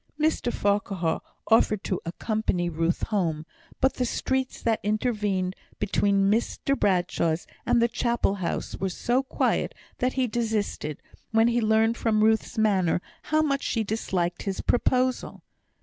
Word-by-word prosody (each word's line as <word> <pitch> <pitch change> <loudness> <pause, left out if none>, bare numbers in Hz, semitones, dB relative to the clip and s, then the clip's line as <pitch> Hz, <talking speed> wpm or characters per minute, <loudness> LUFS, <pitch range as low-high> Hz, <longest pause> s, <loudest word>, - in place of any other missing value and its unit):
Mr 305 -5 +1
Farquhar 195 -6 0 0.2
offered 215 -2 +3
to 185 - -2
accompany 180 -1 -1
Ruth 165 +2 0
home; 165 -7 0 0.3
but 265 0 +3
the 255 - -1
streets 265 +2 -1
that 225 -1 +1
intervened 210 -4 0 0.2
between 200 -1 +2
Mr 235 +5 0
Bradshaw's 175 -5 +1 0.2
and 240 - +4
the 235 - +4
Chapel 235 -3 0
house 170 - -2
were 190 - -2
so 240 +8 0
quiet 270 - 0 0.2
that 255 +1 +1
he 260 -1 +1
desisted, 220 - -2 0.3
when 225 +1 +4
he 240 0 +1
learnt 220 +1 +3
from 215 -2 +2
Ruth's 220 0 +2
manner 195 -6 +2 0.3
how 310 0 +2
much 275 -2 0
she 225 - 0
disliked 185 -5 -2
his 195 -2 -3
proposal. 255 +1 0
215 Hz, 140 wpm, -26 LUFS, 190-240 Hz, 0.3 s, and